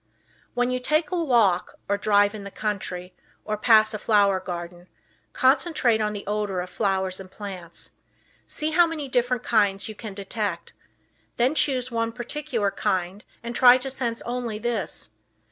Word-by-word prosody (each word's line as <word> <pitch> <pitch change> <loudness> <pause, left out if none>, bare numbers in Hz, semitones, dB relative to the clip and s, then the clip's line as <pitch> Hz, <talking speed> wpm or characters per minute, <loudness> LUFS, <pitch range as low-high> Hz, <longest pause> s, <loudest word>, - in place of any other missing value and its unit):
When 245 +1 +1
you 255 - 0
take 305 +4 +1
a 350 -2 0
walk, 225 - +2
or 200 - +2
drive 205 0 +3
in 210 -2 -7
the 200 - -7
country, 185 -4 -4 0.3
or 215 - -1
pass 215 0 +5
a 215 - -3
flower 200 -3 +3
garden, 175 0 -7 0.4
concentrate 260 -4 +3
on 210 0 0
the 205 - -6
odor 205 -2 -1
of 180 0 -5
flowers 190 -2 -1
and 190 -1 -10
plants. 185 -4 -6 0.6
See 310 +1 -1
how 345 +2 +5
many 310 -4 -4
different 245 -1 0
kinds 200 -3 +2
you 215 - -6
can 210 -1 -8
detect. 200 -3 -4 0.6
Then 250 +4 +3
choose 255 -5 +1
one 230 0 -1
particular 240 -4 -2
kind 185 +2 -2 0.2
and 235 0 -5
try 250 0 +8
to 265 +1 -3
sense 235 -3 -2
only 240 -3 -3
this. 220 - -2
215 Hz, 160 wpm, -25 LUFS, 195-250 Hz, 0.6 s, try